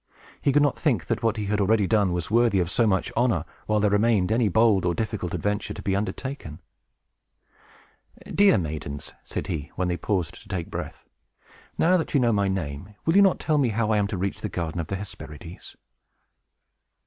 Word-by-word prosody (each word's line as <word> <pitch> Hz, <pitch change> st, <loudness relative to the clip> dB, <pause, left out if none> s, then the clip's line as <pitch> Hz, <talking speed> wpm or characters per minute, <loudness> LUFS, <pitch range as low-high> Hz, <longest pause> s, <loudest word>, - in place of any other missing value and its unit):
He 140 Hz, -, +2 dB
could 145 Hz, +2 st, +4 dB
not 145 Hz, -3 st, +1 dB
think 120 Hz, -, +1 dB
that -, -, -1 dB
what 115 Hz, -1 st, +1 dB
he 105 Hz, -, -2 dB
had 105 Hz, +1 st, 0 dB
already 105 Hz, +1 st, +3 dB
done 100 Hz, -2 st, +2 dB
was 85 Hz, +2 st, -3 dB
worthy 115 Hz, -3 st, +4 dB
of 90 Hz, -1 st, 0 dB
so 115 Hz, -, +3 dB
much 95 Hz, -2 st, +1 dB
honor, 115 Hz, -, +1 dB, 0.2 s
while 110 Hz, 0 st, +2 dB
there 105 Hz, 0 st, +2 dB
remained 105 Hz, -2 st, +2 dB
any 115 Hz, -1 st, +3 dB
bold 110 Hz, -1 st, +4 dB
or 90 Hz, -1 st, +1 dB
difficult 105 Hz, -3 st, -3 dB
adventure 105 Hz, 0 st, -2 dB
to -, -, -7 dB
be 95 Hz, -, 0 dB
undertaken. 105 Hz, -, -4 dB, 1.7 s
"Dear 200 Hz, -, +5 dB
maidens," 75 Hz, -4 st, -5 dB
said -, -, -5 dB
he, 80 Hz, -6 st, -4 dB
when 90 Hz, -1 st, -1 dB
they 90 Hz, -, -1 dB
paused 90 Hz, -6 st, -2 dB
to -, -, -18 dB
take 90 Hz, -3 st, -4 dB
breath, -, -, -6 dB, 0.7 s
"now 180 Hz, +3 st, +4 dB
that 160 Hz, -, -3 dB
you -, -, +5 dB
know 120 Hz, -2 st, +3 dB
my 100 Hz, -1 st, +2 dB
name, 95 Hz, +1 st, -4 dB
will 165 Hz, -, +2 dB
you 200 Hz, -, +8 dB
not 195 Hz, -2 st, +4 dB
tell 155 Hz, -2 st, +1 dB
me 130 Hz, -4 st, +2 dB
how 110 Hz, 0 st, 0 dB
I 110 Hz, -, +3 dB
am 100 Hz, -, +1 dB
to 100 Hz, -, -4 dB
reach 95 Hz, +2 st, -3 dB
the -, -, -3 dB
garden 85 Hz, -1 st, -3 dB
of 80 Hz, -, -7 dB
the 95 Hz, -, -3 dB
Hesperides?" 90 Hz, -4 st, -9 dB
100 Hz, 205 wpm, -25 LUFS, 90-115 Hz, 1.7 s, you